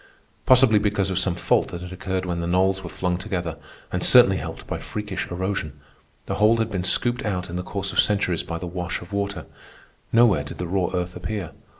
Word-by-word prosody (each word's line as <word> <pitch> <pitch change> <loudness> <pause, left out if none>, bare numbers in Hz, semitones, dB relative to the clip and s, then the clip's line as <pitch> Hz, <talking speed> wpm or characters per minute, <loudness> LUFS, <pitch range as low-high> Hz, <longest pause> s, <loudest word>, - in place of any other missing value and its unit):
Possibly 125 -4 +6
because 100 -2 0
of 90 - 0
some 90 -3 0
fault - - +2
that 85 - -7
had 90 - -8
occurred 95 0 -3
when 85 -1 -2
the 85 - -2
knolls 95 +2 +2
were 90 - -6
flung 90 0 -2
together, 90 -5 -3 0.3
and - - -1
certainly - - +7
helped - - -7
by - - -4
freakish 105 -2 -5
erosion, 90 -5 -3 0.5
the - - -3
hole 110 +2 +5
had 110 -1 -1
been 95 -3 -2
scooped 120 +7 +1
out 90 -5 -3
in - - -5
the 90 - -1
course 95 +1 -3
of - - +1
centuries 100 -5 +2
by 85 - -5
the 90 - -6
wash 90 0 -4
of 90 +3 -11
water. 100 0 -2 0.7
Nowhere 115 -10 +5
did 70 - -8
the 90 - -3
raw 90 0 0
earth 90 0 -2
appear. 90 0 -4
95 Hz, 215 wpm, -24 LUFS, 90-100 Hz, 0.7 s, certainly